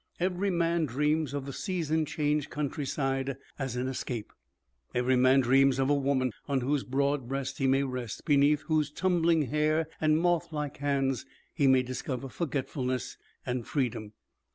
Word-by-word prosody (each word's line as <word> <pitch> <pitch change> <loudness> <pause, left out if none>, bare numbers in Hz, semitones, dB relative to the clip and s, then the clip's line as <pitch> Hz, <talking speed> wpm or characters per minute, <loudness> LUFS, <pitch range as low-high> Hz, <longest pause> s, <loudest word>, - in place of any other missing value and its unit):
Every 185 +2 0
man 170 -2 +1
dreams 150 +3 0
of 140 -1 -4
the 140 - -6
season 160 -4 -1
changed 150 -1 0
countryside 135 -2 -2 0.2
as 135 -3 -3
an 125 +1 -1
escape; 125 -3 -4 0.6
every 125 +1 +2
man 130 +2 +5
dreams 135 +1 +4
of 135 +1 +2
a - - +5
woman 135 -2 +1 0.2
on 140 -2 +1
whose 140 +2 0
broad 140 0 0
breast 135 +1 -3
he 135 - +2
may 135 +1 +3
rest, 125 -5 -5
beneath 145 0 +4
whose 155 -2 +1
tumbling 170 -1 +2
hair 155 +3 +1 0.2
and 155 0 +4
moth 170 0 +1
like 150 -2 -4
hands 135 -2 0 0.3
he 145 -4 +2
may 130 -1 +5
discover 130 +1 -4
forgetfulness 130 -3 -3 0.3
and 125 -2 -3
freedom. 115 -6 -2
140 Hz, 155 wpm, -29 LUFS, 130-155 Hz, 0.6 s, man